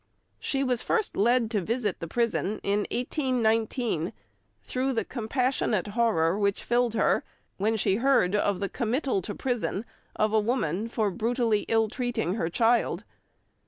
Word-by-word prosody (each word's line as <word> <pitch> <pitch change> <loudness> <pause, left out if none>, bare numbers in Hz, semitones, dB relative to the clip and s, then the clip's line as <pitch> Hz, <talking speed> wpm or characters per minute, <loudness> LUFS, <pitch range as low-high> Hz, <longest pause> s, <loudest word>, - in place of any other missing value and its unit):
She 275 -1 0
was 250 -3 0
first 440 - 0
led 235 +2 +2
to 210 -4 +1
visit 215 0 -1
the 165 - -5
prison 220 0 0
in 200 +1 0
1819, 235 - 0 0.5
through 265 +1 -1
the 230 - -1
compassionate 240 -4 -1
horror 205 -6 +2
which 200 -1 0
filled 240 -1 +1
her - - +2 0.3
when 220 +3 +1
she 195 -1 +2
heard 235 -7 +3
of 205 -2 +1
the 200 - 0
committal 245 0 -1
to 205 - -5
prison 240 -4 -2 0.3
of 215 0 +1
a 220 - +5
woman 210 - 0
for 220 -3 0
brutally 230 0 0
ill 225 -1 +3
treating 235 -5 -2
her 180 -6 -1
child. 230 +6 +2
225 Hz, 150 wpm, -27 LUFS, 205-245 Hz, 0.5 s, a